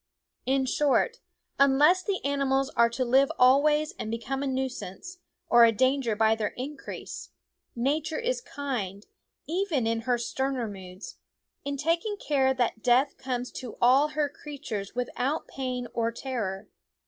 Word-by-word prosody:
In 265 0 +2
short, 295 - +1 0.4
unless 290 +7 +5
the 395 -7 -2
animals 275 -1 +1
are 235 0 +4
to 255 +2 -2
live 265 +3 +4
always 295 +4 +4
and 215 - -4
become 235 +4 -3
a 280 - -1
nuisance 265 - -4 0.3
or 240 0 +7
a 230 - +7
danger 260 0 +1
by 220 +1 +4
their 220 -2 -3
increase, 275 +3 -7 0.5
Nature 300 +7 0
is - - -1
kind, 230 - -4 0.4
even 330 - 0
in 225 0 0
her 245 +1 +1
sterner 265 0 -2
moods, 190 -1 -9 0.5
in 280 0 -3
taking 335 +8 0
care 270 -7 +2
that 245 -3 -1
death 250 +4 +3
comes 250 -1 -3
to 250 -3 -8
all 260 +4 +5
her 300 -1 0
creatures 280 -9 -7
without 250 +4 -2
pain 255 -2 -4
or 230 0 0
terror. 225 -6 -4
265 Hz, 145 wpm, -27 LUFS, 235-290 Hz, 0.5 s, or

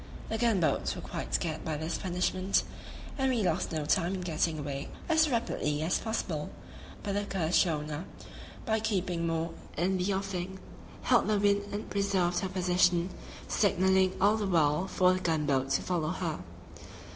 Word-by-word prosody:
The 225 - -2
gun 230 -4 +3
boats 165 - +1
were - - -6
quite - - -5
scared - - -2
by 155 -2 -2
this 160 +2 -3
punishment, 185 +1 0 0.6
and 265 0 +2
we 235 -4 +1
lost 180 - 0
no 155 -2 -2
time 170 +5 +2
in 185 - -4
getting 165 -2 0
away 140 -1 -4 0.2
as 315 -1 +4
rapidly 155 - -1
as 165 - +1
possible; 180 -9 -2 0.5
but 200 - -2
the 205 - +1
accursed 185 -4 +2
schooner, 155 -1 -2 0.6
by 220 -3 +1
keeping 185 -6 -1
more 165 0 -1 0.3
in 185 +3 +1
the 185 +3 +1
offing, 190 -1 -3 0.5
held - - +4
the 215 -1 +2
wind 205 0 +2
and 205 +1 -5
preserved 190 -3 +1
her 190 - -2
position, 180 -1 +2 0.4
signaling 190 -2 +3
all 205 +3 +4
the 210 -2 -1
while 165 0 +2
for 185 -1 +3
the 185 - -1
gun 160 -4 0
boats 135 -1 +1
to - - 0
follow 170 -4 -1
her. 170 -3 -2
180 Hz, 170 wpm, -30 LUFS, 160-200 Hz, 0.6 s, as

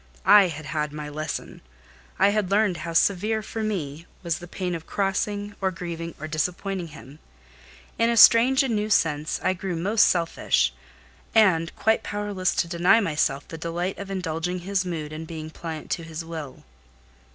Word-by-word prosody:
I 205 -2 +8
had 155 -2 -7
had 150 +1 -2
my 150 0 -6
lesson: 155 +1 -5 0.6
I 195 +1 +5
had 205 -2 0
learned 200 -3 +2
how 165 0 -5
severe 210 +5 +2
for 225 +1 -5
me 170 -7 -3 0.2
was 170 -2 -1
the 175 - -10
pain 180 0 -3
of 165 -1 -6
crossing, 205 +1 -1
or 190 - +2
grieving, 170 -2 -6
or 155 - -5
disappointing 180 +3 -2
him. 145 -1 -13 0.8
In 230 0 +3
a 235 - +1
strange 245 +5 +7
and 245 -4 0
new 210 +1 -1
sense, 155 -6 +1
I - - +2
grew 185 -1 -4
most 205 +6 +3
selfish, 170 -2 +1 0.6
and 180 -7 +4
quite 220 0 +2
powerless 205 -3 -2
to - - +1
deny 175 +6 +4
myself 150 -7 0
the 165 - -8
delight 175 +3 -3
of 200 -1 -7
indulging 180 -1 -3
his 195 +1 0
mood, 155 -3 -4
and 160 +1 -7
being 155 -1 -7
pliant 160 -2 -7
to 170 - -1
his 165 0 -7
will. 160 -5 -8
175 Hz, 175 wpm, -25 LUFS, 160-200 Hz, 0.8 s, I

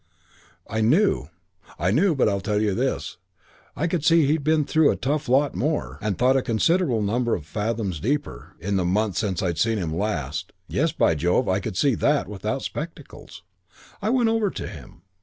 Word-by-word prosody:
"I 110 +1 -2
knew. 140 - +2 0.5
I 90 +2 +1
knew; 165 - +3
but 135 - +3
I 100 -2 +1
tell 105 +1 -1
you 105 -2 +1
this, 130 +6 -2 0.6
I 160 - -1
could 170 -3 -1
see 165 -1 +5
he'd 150 +1 +1
been 155 0 +2
through 160 +1 +3
a - - +1
tough 140 +2 -2
lot 140 +3 +3
more, 150 +3 -2
and 105 -3 -2
thought 130 +2 +3
a 135 - +3
considerable 125 - +1
number 120 +3 0
of 80 - -7
fathoms 105 -2 -2
deeper, 120 - -3
in 100 +3 -1
the 95 - +1
month 100 +2 0
since 95 -5 -1
I'd 85 -3 -1
seen 115 -1 +2
him 80 -5 -3
last. 95 -8 -3
Yes, - - 0
by - - +2
Jove, 85 +4 +1
I 95 +1 +1
could 95 - -5
see 140 +4 +3
that 145 +5 +1
without 100 -3 -3
spectacles. - - -8 0.6
"I 210 - 0
went 245 -2 +3
over 225 -2 +1
to - - -6
him. - - -12
115 Hz, 195 wpm, -24 LUFS, 100-150 Hz, 0.6 s, see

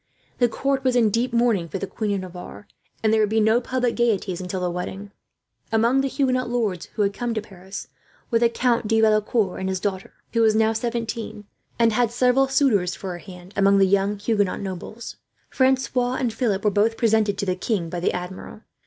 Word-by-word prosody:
The 245 -1 +4
court 270 +3 -1
was 255 -2 +2
in 225 -4 +4
deep 240 +4 0
mourning 230 -8 +1
for 195 - -3
the 195 - -3
Queen 205 +1 -2
of 195 - -2
Navarre, 180 +2 -9 0.4
and 220 0 +3
there 220 - +4
would 210 - +2
be 220 +1 +2
no 220 +3 +3
public 250 -1 -1
gaieties 205 -6 0
until 185 +1 -4
the 180 -1 -1
wedding. 190 +3 -6 0.6
Among 235 +4 +3
the 275 - 0
Huguenot 255 -2 0
lords 215 -8 -1
who 210 - +2
had 200 0 0
come 235 +2 -3
to - - +1
Paris 190 -1 -9 0.4
were 230 - +3
the 235 0 +4
Count 235 -1 0
de 225 +1 +2
Valecourt 215 -2 +2
and 190 0 -2
his 190 -1 -1
daughter, 190 -1 -4 0.2
who 230 - +2
was 220 -1 +4
now 220 0 +3
seventeen, 230 -2 -4 0.3
and 230 -1 +3
had 240 0 +2
several 250 +3 +3
suitors 240 -10 +2
for 190 - -6
her 175 - -6
hand 180 +1 -12
among 200 0 +4
the 195 - +5
young 200 +2 +1
Huguenot 205 -2 0
nobles. 195 +4 -7 0.3
Francois 260 -1 +1
and 245 -4 -1
Philip 220 -4 -1
were 210 - +4
both 215 +3 +2
presented 220 -3 +2
to 200 - -2
the 185 -1 0
king 185 -2 -2
by 175 +1 -4
the 175 - +1
Admiral. 180 +4 -7
220 Hz, 210 wpm, -23 LUFS, 195-240 Hz, 0.6 s, the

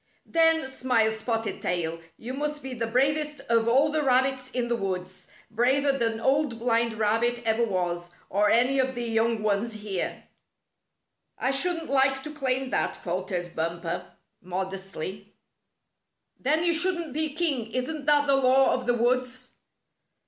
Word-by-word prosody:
" - - -40
Then," 325 -3 +3
smiled 250 -4 +1
Spotted 225 0 -3
Tail, 165 -2 -1
" 165 - -38
you 255 - -3
must 295 +1 -3
be 265 -1 -5
the 230 -2 -2
bravest 290 +5 +1
of 230 -1 +1
all 270 +6 +4
the 310 0 +1
rabbits 260 -1 +1
in 250 -2 -2
the 240 - +1
woods 185 -3 -4
— - - -29
braver 265 +5 +3
than 230 -4 -1
Old 270 0 +1
Blind 230 0 +1
Rabbit 230 +3 0
ever 225 +1 +2
was, 175 -4 -2 0.2
or 205 +2 +2
any 250 +5 +3
of 260 0 +1
the 240 - -3
young 225 -1 0
ones 215 +2 0
here." 210 -4 -4 0.6
" - - -55 0.3
I 260 - 0
shouldn't 330 +3 0
like 270 0 +2
to 300 - -7
claim 265 -3 -1
that," - - 0
faltered 180 -1 -4
Bumper, 170 +1 -3 0.3
modestly. 190 +1 -5 0.5
" - - -52
Then 305 +5 +1
you 345 -1 +3
shouldn't 340 -3 0
be 310 -1 0
king. 280 -9 0
Isn't 280 +4 -3
that 290 -1 +4
the 275 -1 +4
law 265 0 +4
of 255 -1 -3
the 245 - +3
woods? 255 +2 0
245 Hz, 165 wpm, -26 LUFS, 215-275 Hz, 0.6 s, all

